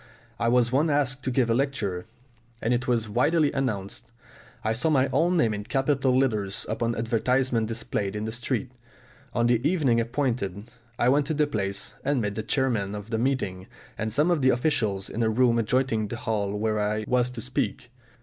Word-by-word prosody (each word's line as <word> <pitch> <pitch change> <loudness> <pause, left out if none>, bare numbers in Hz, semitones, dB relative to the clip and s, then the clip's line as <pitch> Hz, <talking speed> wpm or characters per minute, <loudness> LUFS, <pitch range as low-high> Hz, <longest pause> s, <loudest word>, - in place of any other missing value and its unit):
I 115 - +1
was 120 0 +3
once 145 +5 +2
asked 140 -2 0
to - - +1
give 125 -1 +2
a 115 - +2
lecture, 115 -8 -1 0.5
and 115 +2 0
it 120 +1 -1
was 115 -3 +1
widely 145 +7 +2
announced. 115 -3 -3 0.5
I 110 - +1
saw 125 +8 0
my 135 -3 +3
own 175 +2 +3
name 115 -9 +3
in 105 0 -4
capital 135 0 +1
letters 110 -7 0
upon 115 +1 -1
advertisements 115 +1 +1
displayed 105 -3 -2
in 105 +1 -3
the 110 - -3
street. 125 +2 -2 0.6
On 120 -1 +2
the 120 -1 +3
evening 145 -8 +2
appointed, 115 -4 -2 0.3
I 120 - +2
went 140 +2 +3
to 155 - -1
the 150 0 +3
place, 100 -6 -3
and 140 -1 +1
met 105 -3 -1
the 110 - -3
chairman 110 -5 0
of 105 +2 -8
the 110 - 0
meeting 115 -8 -1 0.3
and 110 0 -3
some 150 +9 +2
of 165 -4 +2
the 130 - +4
officials 115 -8 +1
in 115 - -4
a 110 - +3
room 120 +1 +3
adjoining 115 -1 +1
the 120 - -5
hall 105 -5 -2
where 110 0 0
I 105 +1 -1
was 125 0 +2
to 125 -2 -7
speak. 125 -1 -3
120 Hz, 195 wpm, -26 LUFS, 110-130 Hz, 0.6 s, the